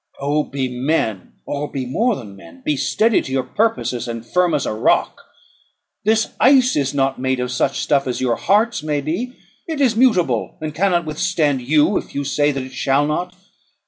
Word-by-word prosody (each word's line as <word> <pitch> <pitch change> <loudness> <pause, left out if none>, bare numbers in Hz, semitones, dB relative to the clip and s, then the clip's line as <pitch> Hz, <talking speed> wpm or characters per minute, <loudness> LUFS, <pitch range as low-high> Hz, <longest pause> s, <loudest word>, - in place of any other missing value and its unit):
Oh! 145 +2 0
be 135 -1 -3
men, 125 - -2
or 145 +1 -3
be 130 -2 -3
more 225 - +1
than 105 - -9
men. 85 -2 -15
Be 150 - +1
steady 220 +10 +2
to 130 - -8
your 130 -1 0
purposes, 125 - -1
and 115 -1 -5
firm 180 +5 +2
as 145 - -1
a - - -2
rock. 110 - +1 0.8
This 220 +1 +2
ice 260 -2 +5
is 140 -1 0
not 135 -1 0
made 130 0 0
of 125 0 -2
such 125 +2 0
stuff 140 -2 +1
as 125 - -2
your 125 -2 +1
hearts 215 0 +1
may 150 -2 -1
be; 210 - -3 0.3
it 320 -3 -3
is 255 -5 +3
mutable, 185 - +2
and 155 -1 -5
cannot 175 0 +1
withstand 155 -3 0
you, 155 +8 +3
if - - -6
you 140 - -1
say 145 +1 +1
that 135 -2 -3
it 130 0 -10
shall 135 +2 +1
not. 180 +4 -2
145 Hz, 195 wpm, -20 LUFS, 130-180 Hz, 0.8 s, ice